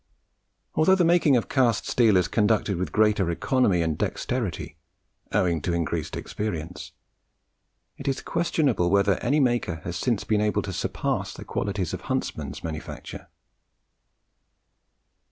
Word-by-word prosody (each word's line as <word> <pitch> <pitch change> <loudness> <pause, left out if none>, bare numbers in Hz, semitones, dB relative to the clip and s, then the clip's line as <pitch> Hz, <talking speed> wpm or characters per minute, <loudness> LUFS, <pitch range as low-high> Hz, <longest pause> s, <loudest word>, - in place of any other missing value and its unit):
Although 190 +5 +4
the 180 -2 +3
making 165 -5 +4
of 115 - -1
cast 120 -5 +2
steel 110 -5 +4
is 90 - +2
conducted 105 -2 +1
with 90 - -3
greater 105 -4 +3
economy 95 0 +2
and 80 -1 0
dexterity, 110 -12 -2 0.6
owing 90 -6 +1
to 90 - -1
increased 85 -2 -2
experience, 90 -5 -5 1.0
it 140 - -8
is 135 -1 -1
questionable 140 - +1
whether 100 0 +3
any 140 +5 +1
maker 120 - +1
has 85 - -4
since 115 -5 0
been 105 -1 +1
able 105 0 +1
to - - -5
surpass - - -2
the - - -9
quality 100 -1 -2
of 85 - -4
Huntsman's - - -3
manufacture. 80 -1 -7
105 Hz, 135 wpm, -25 LUFS, 90-125 Hz, 1.0 s, Although